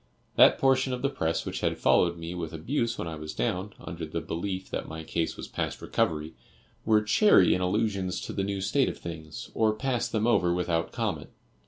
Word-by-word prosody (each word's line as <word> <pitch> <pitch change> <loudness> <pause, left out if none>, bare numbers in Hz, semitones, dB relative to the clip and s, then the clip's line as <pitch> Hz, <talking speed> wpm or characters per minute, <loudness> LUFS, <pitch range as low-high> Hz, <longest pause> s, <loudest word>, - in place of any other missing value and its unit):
That - - +7
portion 130 -1 +3
of 125 - -4
the 140 - +1
press 80 -7 -1
which - - -3
had - - 0
followed 85 -1 +3
me 85 +1 -6
with 85 -3 -5
abuse 115 - -1
when - - -4
I 80 -1 -5
was 75 0 -7
down, 90 +11 -2
under 85 -1 -7
the 80 - -3
belief 95 +2 -4
that - - -3
my 80 0 -7
case 80 +1 -2
was - - -6
past - - -3
recovery, 80 +1 -1 0.5
were 110 -1 +4
chary 105 - +5
in 90 - 0
allusions 95 -1 0
to - - -6
the 100 - -1
new 100 0 -2
state 135 +8 +2
of - - -6
things, 80 -2 -8
or 110 -1 +2
passed 120 -1 -1
them 110 -1 +1
over 90 -7 +3
without 85 -2 0
comment. - - -3
95 Hz, 205 wpm, -28 LUFS, 85-110 Hz, 0.5 s, That